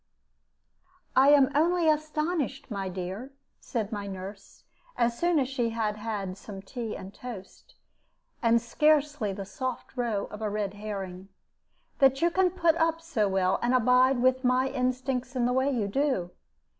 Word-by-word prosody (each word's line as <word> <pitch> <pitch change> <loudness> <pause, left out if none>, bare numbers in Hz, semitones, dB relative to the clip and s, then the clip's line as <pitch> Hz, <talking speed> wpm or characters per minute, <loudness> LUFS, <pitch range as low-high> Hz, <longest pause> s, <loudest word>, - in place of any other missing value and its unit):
"I 270 +2 +6
am 285 -2 +6
only 335 +3 +3
astonished, 305 -3 -1
my 195 -2 -3
dear," 190 +9 -6 0.3
said 220 -4 -3
my 205 -2 -4
nurse, 195 +1 -9 0.3
as 235 -1 +2
soon 345 +4 +2
as 270 -3 +2
she 250 -3 -1
had 220 -2 -2
had 205 -3 -4
some 195 -2 -9
tea 230 +1 -5
and 190 +2 -9
toast, 215 -6 -10 0.7
and 235 -1 +4
scarcely 295 -1 +2
the 195 0 -6
soft 255 +7 -5
roe 235 -5 -1
of 210 - -8
a 215 - -1
red 205 -1 -2
herring, 195 -3 -6 0.7
"that 270 -1 +5
you 340 +1 +3
can 375 +1 +3
put 340 -2 +2
up 325 0 +1
so 285 -12 0
well, 190 -1 +1
and 245 +2 +2
abide 250 +1 +4
with 255 +1 +3
my 255 +1 +2
instincts 255 0 -2
in 245 -2 +1
the 250 - +1
way 260 +2 +2
you 235 -7 0
do. 230 -6 0
245 Hz, 160 wpm, -28 LUFS, 205-275 Hz, 0.7 s, I